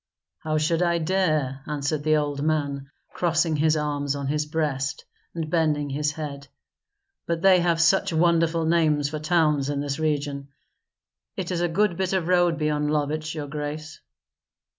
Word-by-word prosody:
"How 155 0 -1
should 160 +2 +1
I 170 -1 +2
dare," 155 -6 0
answered 150 0 -2
the 155 +1 +2
old 145 -1 -2
man, 140 -3 -1 0.2
crossing 165 -2 +1
his 155 +1 +2
arms 145 -2 -1
on 140 -1 -4
his 150 +2 -1
breast 150 -4 -2 0.3
and 165 -2 -3
bending 150 -3 0
his 150 +1 -1
head; 145 -2 -6 0.8
"but 170 -1 -2
they 190 -1 +6
have 170 -1 +1
such 165 +4 +3
wonderful 165 0 +2
names 155 -3 +2
for 155 0 -4
towns 155 -3 +1
in 145 -1 -1
this 140 +1 -3
region. 145 -3 -2 0.9
It 185 -1 -3
is 175 -1 -1
a 175 - +2
good 175 +1 +1
bit 190 0 -1
of 185 -3 0
road 175 -2 +3
beyond 150 -1 0
Lovich, 155 +1 -1
your 150 -2 -4
grace." 150 +1 -6
155 Hz, 160 wpm, -25 LUFS, 145-165 Hz, 0.9 s, they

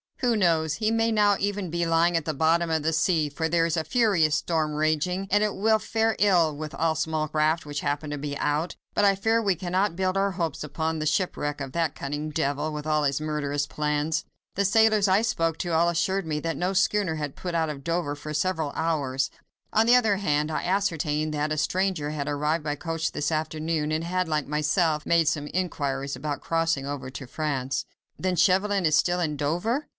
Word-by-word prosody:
Who 245 -3 +2
knows? 165 -6 +2
He 215 0 0
may 225 0 +2
now 205 -2 +4
even 200 -3 -2
be 170 +1 0
lying 165 +1 +3
at 165 -2 0
the 155 - -1
bottom 165 +4 +2
of 160 -2 0
the 160 +1 +1
sea, 160 -1 +2
for 160 +3 -2
there 165 0 +2
is 165 - 0
a 160 - 0
furious 165 -5 +2
storm 155 -1 0
raging, 155 +5 0
and 205 +1 +4
it 210 - 0
will 220 +2 +3
fare 225 0 0
ill 175 -6 +3
with 155 +1 -6
all 165 -1 +1
small 155 0 -1
craft 155 +1 +1
which 145 -1 -4
happen 145 +1 -2
to 145 - -4
be 145 0 -4
out. 150 +4 -1 0.2
But 205 - +1
I 200 -1 +5
fear 225 +4 +1
me 215 - -5
we 195 - +3
cannot 185 +2 -1
build 185 +1 0
our 200 0 +2
hopes 165 -5 -3
upon 160 +2 -2
the 155 - -1
shipwreck 145 -3 -1
of 135 -2 -5
that 165 -3 0
cunning 145 +2 -4
devil, 145 -1 -1
and 155 -1 -4
of 150 - -7
all 155 -1 +2
his 140 -1 +1
murderous 145 -2 -1
plans. 150 +2 -1 0.3
The 200 - +1
sailors 215 0 +4
I 195 +3 +3
spoke 165 -7 0
to, 175 - -2
all 170 +2 +3
assured 190 +3 0
me 150 -1 -1
that 165 -2 -2
no 180 +4 -1
schooner 195 -3 +1
had 150 -3 -4
put 175 -2 -5
out 160 -1 +1
of 140 -2 -6
Dover 165 -3 -1
for 150 +1 -7
several 160 -2 -1
hours: 140 -5 -1 0.4
on 220 +1 +3
the 240 - +7
other 220 -5 +3
hand, 150 -5 0
I 155 - -2
ascertained 160 -5 0
that 150 +1 -1
a 155 - -1
stranger 180 -2 0
had 150 -2 -4
arrived 150 +2 0
by 150 -1 -2
coach 165 +1 -3
this 145 +2 -2
afternoon, 155 0 -1
and 155 +1 -1
had, 180 +1 -1
like 150 -2 -1
myself, 150 +1 +1
made 165 -2 +3
some 145 -1 0
inquiries 140 -7 -2
about 145 +2 -4
crossing 165 -4 0
over 140 -2 -5
to 135 +1 -8
France." 135 -1 -2 0.3
"Then 185 -1 0
Chauvelin 190 +2 +2
is 155 -1 +4
still 175 +2 +2
in 155 -4 -1
Dover?" 175 - -1
160 Hz, 220 wpm, -26 LUFS, 150-185 Hz, 0.4 s, the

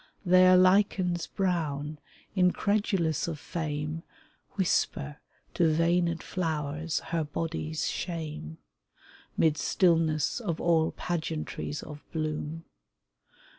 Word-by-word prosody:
There 185 0 +7
lichens 185 -2 +3
brown, 155 -6 -2 0.4
incredulous 185 -3 +1
of 165 -2 -3
fame, 150 0 -3 0.5
Whisper 150 -6 0 0.4
to 165 -3 +3
veined 170 +1 +2
flowers 155 -2 -2
her 165 -1 +1
body's 155 +1 -3
shame, 155 - -4 0.8
'Mid 155 -1 +3
stillness 165 - +2
of 175 -9 -3
all 165 -2 +3
pageantries 160 -3 -3
of 150 -1 -9
bloom. 155 0 -3
165 Hz, 90 wpm, -29 LUFS, 155-180 Hz, 0.8 s, There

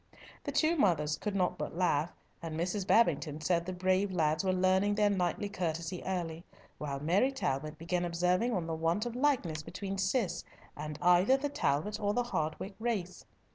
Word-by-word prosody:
The - - -2
two 330 +2 +2
mothers 155 - +2
could 205 +5 -4
not 180 -2 0
but - - -4
laugh, 170 -3 +1 0.3
and 165 -2 -4
Mrs. 185 +3 -1
Babington 165 -7 +3
said 170 +2 0
the - - -2
brave 185 +2 +1
lads 155 -1 +1
were 190 - +2
learning 190 +2 +2
their 210 -1 +3
knightly 185 +1 0
courtesy 175 -2 -3
early, 170 -3 -3 0.4
while 140 -2 -3
Mary 185 - +2
Talbot 155 - -2
began 175 +2 -1
observing 180 +6 +1
on 185 -7 -1
the 165 - -3
want 165 +7 0
of 240 -1 -4
likeness 245 - +1
between 190 +5 -5
Cis 190 -3 0 0.3
and 150 0 -5
either 180 +9 +5
the 290 +2 -2
Talbot 165 - 0
or 205 0 0
Hardwicke 195 -6 -2
race. 215 -6 -3
180 Hz, 175 wpm, -32 LUFS, 165-205 Hz, 0.4 s, either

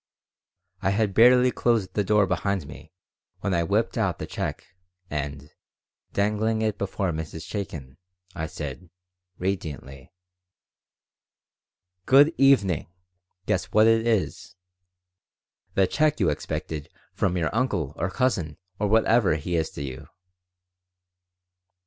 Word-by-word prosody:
I 95 - +1
had 100 0 +1
barely 125 +3 +6
closed 110 -8 0
the 105 - +1
door 105 +1 +3
behind 95 -1 -1
me 75 +1 -12 0.5
when 100 -1 -1
I 85 - +2
whipped 105 +7 0
out 95 -7 0
the - - -5
check, - - -4 0.5
and, 75 0 -4 0.6
dangling 110 +2 0
it 110 -2 -1
before 95 -2 -1
Mrs. 80 0 -6
Chaikin, 80 -10 -6 0.4
I 80 -1 -4
said, 80 +3 -7 0.5
radiantly: 75 -7 -5 2.0
"Good 145 +5 +6
evening. 115 - +4 0.6
Guess 95 -2 0
what 110 +4 +4
it 115 0 +3
is!" 110 -5 -1 1.2
"The 95 - +4
check 155 +8 +1
you 90 - +3
expected 75 0 -5 0.2
from 90 -1 0
your 85 -2 -1
uncle 90 - 0
or 90 - -2
cousin 95 - -1 0.2
or 105 - +1
whatever 110 -3 +3
he 85 +3 -3
is 80 -1 0
to 70 - -7
you. 65 -2 -7
95 Hz, 120 wpm, -25 LUFS, 80-110 Hz, 2.0 s, barely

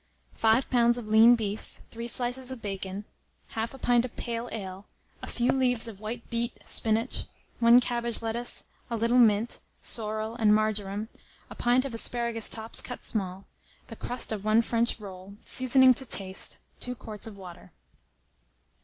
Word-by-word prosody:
5 225 +4 +2
lbs. 240 -1 +4
of 240 - -6
lean 225 +3 +7
beef, 215 -2 -5
3 230 +1 -6
slices 245 +1 -1
of 260 -2 -5
bacon, 195 -1 -5 0.5
1/2 230 +4 -4
pint 240 -1 +3
of 250 - -6
pale 235 0 -4
ale, 195 -2 -7 0.3
a - - -7
few 240 0 0
leaves 245 -3 +2
of 210 -4 -9
white 225 +3 -6
beet, 235 +1 -2
spinach, 225 +1 -1 0.3
1 235 +1 +7
cabbage 235 -2 0
lettuce, 230 +1 -2 0.3
a 235 - -2
little 235 +3 +2
mint, 220 0 +3 0.2
sorrel, 220 0 +1
and 210 -2 +5
marjoram, 215 -1 -1 0.4
a - - -8
pint 245 +2 +2
of 270 - -5
asparagus 235 -1 +2
tops 225 0 -1
cut 245 - -7
small, 195 -2 -2 0.4
the - - -8
crust 245 -1 -1
of 210 -2 -4
1 215 +2 +3
French 230 +1 0
roll, 195 -1 -10
seasoning 260 0 +5
to 260 - -2
taste, 195 -6 +1 0.2
2 250 0 -3
quarts 215 -2 -3
of 210 -3 -10
water. 180 -3 -12
230 Hz, 160 wpm, -27 LUFS, 215-240 Hz, 0.5 s, lean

